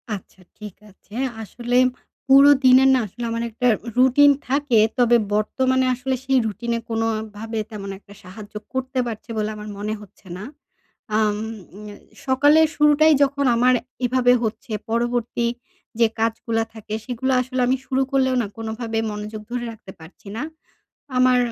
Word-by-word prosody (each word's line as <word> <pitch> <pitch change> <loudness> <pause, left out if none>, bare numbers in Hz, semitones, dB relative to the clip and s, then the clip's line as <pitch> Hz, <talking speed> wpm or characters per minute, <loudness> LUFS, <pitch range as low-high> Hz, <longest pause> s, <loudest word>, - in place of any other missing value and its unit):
আচ্ছা 190 -1 -13 0.2
ঠিক 210 -3 -9
আছে। 205 +2 -17 0.3
আসলে 240 +3 -2 0.5
পুরো 275 +1 +8 0.2
দিনের 260 +1 +7
না 260 - +3
আসলে 240 +5 -9
আমার 230 0 -2
একটা 235 +3 -1 0.3
রুটিন 260 +3 +6 0.2
থাকে। 270 -3 +2 0.2
তবে 240 -1 +5 0.2
বর্তমানে 260 +5 +1
আসলে 260 +1 -2
সেই 265 0 +2
রুটিনে 230 +3 -3
কোনভাবে 225 -1 -3
তেমন 200 -2 -7
একটা 200 - -17
সাহায্য 200 +3 -11 0.2
করতে 260 0 -2
পারছে 225 -1 -7
বলে 215 0 -1
আমার 210 0 -8
মনে 210 +1 -3
হচ্ছে 200 -1 -17
না। 190 - -8 0.7
আম 210 -1 +1 0.5
এ - - -10 0.3
সকালের 290 +4 +5
শুরুটাই 300 +1 +5
যখন 280 0 0
আমার 250 +2 +4 0.3
এভাবে 245 0 +3
হচ্ছে 220 +1 -4 0.2
পরবর্তী 240 0 0 0.5
যে 230 - +6
কাজগুলো 225 0 0
থাকে 215 -1 -9
সেগুলো 260 +1 -2
আসলে 255 0 -3
আমি 260 +1 +2
শুরু 265 0 0
করলেও 260 -1 +2
না 220 - -3
কোনভাবে 225 0 -4
মনোযোগ 210 +1 -6
ধরে 245 -1 -3
রাখতে 220 -4 -12
পারছি 160 +5 -15
না। - - -3 0.8
আমার 255 0 +5
235 Hz, 150 wpm, -22 LUFS, 215-260 Hz, 0.8 s, পুরো